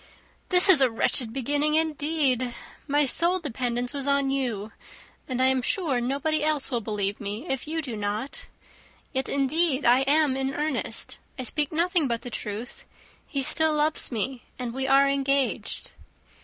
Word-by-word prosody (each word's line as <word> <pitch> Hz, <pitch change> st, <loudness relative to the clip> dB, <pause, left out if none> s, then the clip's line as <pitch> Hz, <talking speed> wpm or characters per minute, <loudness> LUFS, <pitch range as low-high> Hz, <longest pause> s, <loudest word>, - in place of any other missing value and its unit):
"This 360 Hz, +1 st, +5 dB
is 355 Hz, -8 st, +7 dB
a 260 Hz, -, +5 dB
wretched 225 Hz, 0 st, +2 dB
beginning, 290 Hz, +4 st, 0 dB
indeed! 295 Hz, -5 st, 0 dB, 0.3 s
My 290 Hz, 0 st, +3 dB
sole 345 Hz, +7 st, +2 dB
dependence 245 Hz, -4 st, -2 dB
was 280 Hz, -1 st, -2 dB
on 280 Hz, -1 st, +2 dB
you; 230 Hz, -6 st, -2 dB, 0.6 s
and 255 Hz, -2 st, -3 dB
I 260 Hz, -, +4 dB
am 260 Hz, 0 st, +3 dB
sure 280 Hz, -3 st, 0 dB
nobody 285 Hz, +5 st, 0 dB
else 305 Hz, -3 st, +1 dB
will 240 Hz, -2 st, 0 dB
believe 205 Hz, -2 st, -2 dB
me, 205 Hz, +3 st, -4 dB
if 270 Hz, +1 st, -3 dB
you 320 Hz, +1 st, -2 dB
do 250 Hz, -5 st, -5 dB
not. 215 Hz, -, -4 dB, 0.7 s
Yet, 265 Hz, -1 st, -1 dB
indeed, 280 Hz, +1 st, +1 dB
I 245 Hz, +2 st, +6 dB
am 295 Hz, -2 st, +3 dB
in 270 Hz, +1 st, -2 dB
earnest. 300 Hz, -2 st, -3 dB, 0.2 s
I 260 Hz, -, -4 dB
speak 295 Hz, +3 st, -1 dB
nothing 335 Hz, -1 st, +1 dB
but 235 Hz, -1 st, -2 dB
the 245 Hz, -, -7 dB
truth. 215 Hz, +3 st, -6 dB, 0.4 s
He 280 Hz, -4 st, -2 dB
still 315 Hz, +3 st, +2 dB
loves 300 Hz, -1 st, +1 dB
me, 245 Hz, +2 st, -2 dB, 0.2 s
and 245 Hz, -2 st, -4 dB
we 265 Hz, +1 st, -2 dB
are 275 Hz, +1 st, +5 dB
engaged." 275 Hz, -1 st, -1 dB
270 Hz, 165 wpm, -26 LUFS, 245-300 Hz, 0.7 s, is